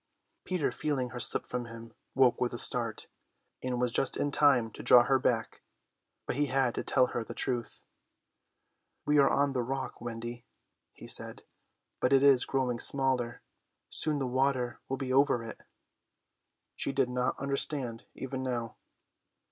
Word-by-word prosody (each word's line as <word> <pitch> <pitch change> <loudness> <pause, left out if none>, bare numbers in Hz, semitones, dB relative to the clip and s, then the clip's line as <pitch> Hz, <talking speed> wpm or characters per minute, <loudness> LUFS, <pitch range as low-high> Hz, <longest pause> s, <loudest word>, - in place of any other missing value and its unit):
Peter, 180 -6 0
feeling 135 -5 -2
her 125 - -6
slip - - 0
from 125 -1 -4
him, 115 0 -10 0.2
woke 130 -2 +4
with 120 -1 0
a - - -4
start, 115 -2 0 0.6
and 125 -1 -2
was 125 -1 +1
just 130 - +1
in 145 - 0
time 130 -6 +4
to - - -9
draw 125 -1 +7
her 135 +1 +2
back. 115 -2 -1 0.6
But - - -3
he 145 0 +2
had 130 -2 +1
to - - -3
tell 130 -2 +3
her 120 - -1
the - - -9
truth. 120 -3 -3 1.2
"We 150 0 +4
are 140 - +6
on 140 0 +2
the 125 - 0
rock, 130 +1 -4
Wendy," 120 0 -6 0.5
he - - -13
said, - - -5 0.6
"but 125 - +2
it 135 0 +5
is 135 -3 +6
growing 125 -3 -1
smaller. 130 -3 0 0.5
Soon 150 -1 0
the 135 - -1
water 130 -1 0
will 135 - -1
be 130 -1 -3
over 135 -3 +3
it." 115 - -9 1.1
She - - -2
did 135 -2 +1
not 125 0 -1
understand 140 -3 -2
even 130 0 -5
now. 120 -3 -3
130 Hz, 165 wpm, -30 LUFS, 120-135 Hz, 1.2 s, draw